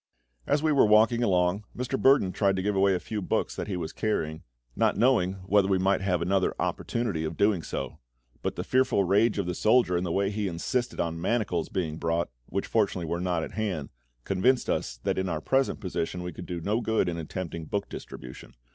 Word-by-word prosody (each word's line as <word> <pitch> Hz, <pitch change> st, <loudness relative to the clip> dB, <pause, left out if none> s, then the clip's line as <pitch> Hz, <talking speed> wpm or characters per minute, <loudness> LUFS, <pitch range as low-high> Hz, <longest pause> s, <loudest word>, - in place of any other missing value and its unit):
As 150 Hz, -, +2 dB
we 155 Hz, -, +3 dB
were 140 Hz, -6 st, +5 dB
walking 110 Hz, +3 st, +5 dB
along 90 Hz, -2 st, +2 dB
Mr. 125 Hz, +2 st, -2 dB
Burdon 135 Hz, -8 st, +4 dB
tried 100 Hz, 0 st, +1 dB
to 95 Hz, -, -2 dB
give 105 Hz, 0 st, 0 dB
away 95 Hz, 0 st, +4 dB
a -, -, -1 dB
few 105 Hz, +4 st, -4 dB
books -, -, -1 dB
that -, -, -4 dB
he 95 Hz, -3 st, -2 dB
was 80 Hz, -2 st, -5 dB
carrying, 80 Hz, -8 st, -2 dB, 0.3 s
not -, -, +2 dB
knowing 115 Hz, -7 st, +3 dB
whether 100 Hz, 0 st, +3 dB
we 95 Hz, -1 st, +2 dB
might 95 Hz, +2 st, +2 dB
have 90 Hz, -3 st, 0 dB
another 95 Hz, +1 st, +1 dB
opportunity 110 Hz, -9 st, -2 dB
of 80 Hz, 0 st, -4 dB
doing 100 Hz, -4 st, +3 dB
so; -, -, -5 dB, 0.4 s
but -, -, -2 dB
the -, -, -3 dB
fearful 130 Hz, -5 st, +2 dB
rage 105 Hz, +5 st, +3 dB
of 100 Hz, -, 0 dB
the 90 Hz, -, -2 dB
soldier, 110 Hz, -1 st, +3 dB
and 90 Hz, -, 0 dB
the 90 Hz, -, -2 dB
way 100 Hz, +2 st, +1 dB
he 105 Hz, -1 st, -2 dB
insisted 120 Hz, +8 st, -2 dB
on 85 Hz, 0 st, -2 dB
manacles 95 Hz, -5 st, 0 dB
being 80 Hz, -4 st, -2 dB
brought, 85 Hz, -3 st, -1 dB, 0.2 s
which 100 Hz, +2 st, -2 dB
fortunately 100 Hz, -6 st, 0 dB
were 85 Hz, +2 st, -2 dB
not 90 Hz, -3 st, 0 dB
at -, -, -6 dB
hand, 95 Hz, -10 st, -3 dB, 0.3 s
convinced 110 Hz, -, +2 dB
us -, -, -2 dB
that -, -, 0 dB
in 95 Hz, 0 st, -1 dB
our 80 Hz, -, -1 dB
present 135 Hz, -, +1 dB
position 90 Hz, -2 st, -3 dB
we 90 Hz, -1 st, -5 dB
could 90 Hz, -, -9 dB
do 90 Hz, -2 st, -4 dB
no 105 Hz, +7 st, 0 dB
good 110 Hz, -5 st, +1 dB
in 85 Hz, -1 st, -2 dB
attempting 85 Hz, 0 st, -5 dB
book 100 Hz, +5 st, -2 dB
distribution. 65 Hz, -1 st, -10 dB
95 Hz, 215 wpm, -27 LUFS, 85-110 Hz, 0.4 s, were